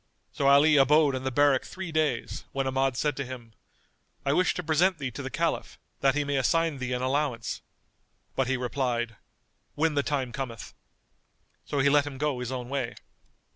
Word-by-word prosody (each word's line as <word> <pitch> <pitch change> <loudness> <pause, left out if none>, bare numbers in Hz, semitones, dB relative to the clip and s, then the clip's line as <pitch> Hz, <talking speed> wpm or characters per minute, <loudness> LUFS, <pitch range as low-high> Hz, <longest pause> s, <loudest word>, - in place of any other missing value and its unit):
So 140 - 0
Ali 145 +2 +6
abode 145 +1 +5
in 130 0 -4
the - - +1
barrack 140 0 +3
three 185 -2 -7
days 155 -7 -1
when 135 0 -1
Ahmad 130 -1 0
said 150 +1 0
to 140 - -1
him, 125 -3 -9 0.7
"I 140 - +2
wish 180 +3 +2
to 180 - -3
present 170 +4 +2
thee 135 -3 -4
to 110 - -7
the - - -5
Caliph, - - -2 0.2
that 135 -1 +3
he 150 - +1
may 140 -1 -1
assign 165 +2 +1
thee 130 -1 -3
an 125 0 -2
allowance." 130 -3 -1 0.7
But 135 - +1
he 130 0 +1
replied, 120 -3 -2 0.6
"When 160 +1 +1
the 145 - +2
time 140 -4 -2
cometh." 120 -4 -6 0.9
So 145 - -3
he 140 - +4
let 145 0 +4
him 135 -2 -6
go 145 -2 -1
his 125 0 -4
own 125 -2 -4
way. 130 -3 -3
135 Hz, 190 wpm, -27 LUFS, 130-150 Hz, 0.9 s, Ali